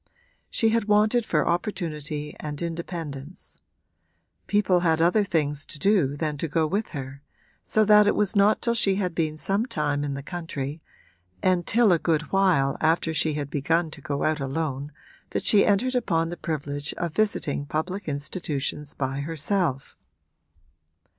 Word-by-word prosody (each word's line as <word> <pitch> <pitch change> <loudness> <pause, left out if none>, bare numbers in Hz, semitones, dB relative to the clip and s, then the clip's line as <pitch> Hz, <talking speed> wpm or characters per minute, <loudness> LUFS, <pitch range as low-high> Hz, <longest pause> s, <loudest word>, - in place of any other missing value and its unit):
She 225 - +2
had 225 -1 +1
wanted 215 +3 +3
for 150 -3 +1
opportunity 155 -5 -3
and 150 -1 -5
independence; 165 -3 -6 0.9
people 205 -3 +3
had 165 -2 +2
other 180 +6 +4
things 150 -6 -1
to - - -5
do 150 -5 +2
than 150 -1 -2
to 165 - -1
go 160 +1 +1
with 200 +8 -1
her, 135 +1 -7 0.4
so 215 0 +2
that 210 0 +6
it - - +3
was 210 +1 +1
not 200 +1 +4
till 235 - +2
she 200 -4 +2
had 185 -3 -1
been 155 -2 -1
some 200 +8 0
time 150 - -1
in 140 -1 -2
the 140 - -6
country 155 -3 -5 0.6
and 180 -2 +2
till 230 -2 +4
a 170 - +4
good 160 -1 +1
while 180 -9 +3
after 160 +1 +2
she 155 0 +1
had 145 -1 -4
begun 160 +3 0
to 150 - -10
go 140 0 -3
out 155 0 +1
alone 140 0 -3 0.4
that - - -3
she 205 -2 +5
entered 225 +6 +2
upon 165 -10 +1
the 175 - -4
privilege 145 -4 -3
of 170 -3 -3
visiting 155 -9 0
public 180 +7 -3
institutions 150 -1 -3
by 135 0 -2
herself. 160 -1 -2
165 Hz, 160 wpm, -25 LUFS, 145-195 Hz, 0.9 s, that